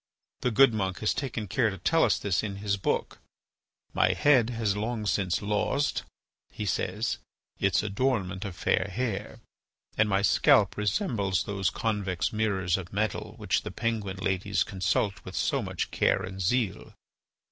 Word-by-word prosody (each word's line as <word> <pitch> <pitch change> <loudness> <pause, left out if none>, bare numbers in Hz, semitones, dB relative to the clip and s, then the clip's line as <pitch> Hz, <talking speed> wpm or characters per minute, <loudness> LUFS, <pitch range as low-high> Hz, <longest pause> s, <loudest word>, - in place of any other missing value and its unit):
The - - 0
good 125 +1 +5
monk 95 -3 -1
has 105 - +2
taken 120 -6 -3
care 115 +5 +2
to 95 - -6
tell 165 - +2
us - - +3
this 100 -3 0
in 100 -2 -4
his 100 0 -1
book: 95 - -2 0.7
"My 90 - +3
head 120 +5 +4
has 110 -4 0
long 110 +1 -2
since 95 -2 0
lost," 105 +8 0 0.5
he 105 - -5
says, 95 - -1 0.4
"its 100 -1 +2
adornment 100 -3 -1
of 100 -4 -6
fair 95 +2 +1
hair, 110 0 -3 0.6
and 110 -1 +4
my 100 0 +2
scalp - - +4
resembles 105 - 0
those 95 -4 -1
convex 100 -5 -1
mirrors 100 -5 +1
of 90 -2 -7
metal 105 0 -2
which - - 0
the - - -6
Penguin 110 -5 -2
ladies 95 +2 0
consult 95 +1 -1
with - - -8
so - - +1
much - - -3
care - - +2
and 95 +1 -6
zeal. 110 +1 0
100 Hz, 160 wpm, -28 LUFS, 95-110 Hz, 0.7 s, good